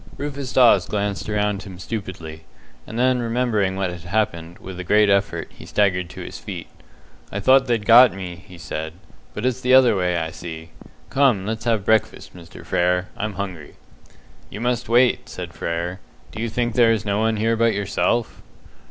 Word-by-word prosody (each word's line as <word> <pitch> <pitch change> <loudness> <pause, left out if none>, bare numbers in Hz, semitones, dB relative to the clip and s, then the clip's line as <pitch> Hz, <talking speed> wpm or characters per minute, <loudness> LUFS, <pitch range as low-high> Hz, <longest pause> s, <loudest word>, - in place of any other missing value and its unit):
Rufus 140 -2 -5
Dawes 115 -8 +5
glanced 100 0 -2
around 105 -1 0
him 95 -2 -10
stupidly, 90 -6 -7 0.4
and 110 - -7
then 125 +1 +2
remembering 115 -5 0
what 95 -2 -1
had 90 -1 -8
happened, 85 -2 -2
with 95 -1 -9
a - - -4
great 105 +3 +4
effort, 100 0 0
he - - -14
staggered 90 -4 0
to - - -9
his - - -8
feet. - - -7 0.7
"I 100 - -3
thought 135 +5 +4
they'd 115 -4 0
got 120 +2 +8
me!" 90 -2 -7
he 90 -3 -12
said, 80 -2 -5 0.4
"but 105 - -3
it's 130 0 0
the 130 +1 +4
other 130 -4 +6
way, 90 -2 0
I 80 -1 -2
see. 80 -1 -8 0.4
Come, 130 -9 +3
let's 110 +1 -4
have 110 -4 +1
breakfast, 110 -2 0
Mr. 85 -2 -12
Frere. 90 +1 +1
I'm 110 0 -3
hungry." 90 -6 -6 0.7
"You - - -8
must 120 0 -1
wait," 120 +1 +3
said - - -7
Frere. 85 +2 -3 0.3
"Do 110 - -6
you 115 - -2
think 120 +1 -1
there 120 -2 +5
is 110 -2 -1
no 100 0 0
one 110 0 +1
here 115 +2 +1
but 115 -1 +2
yourself?" 100 +3 -1
105 Hz, 185 wpm, -22 LUFS, 90-115 Hz, 0.7 s, got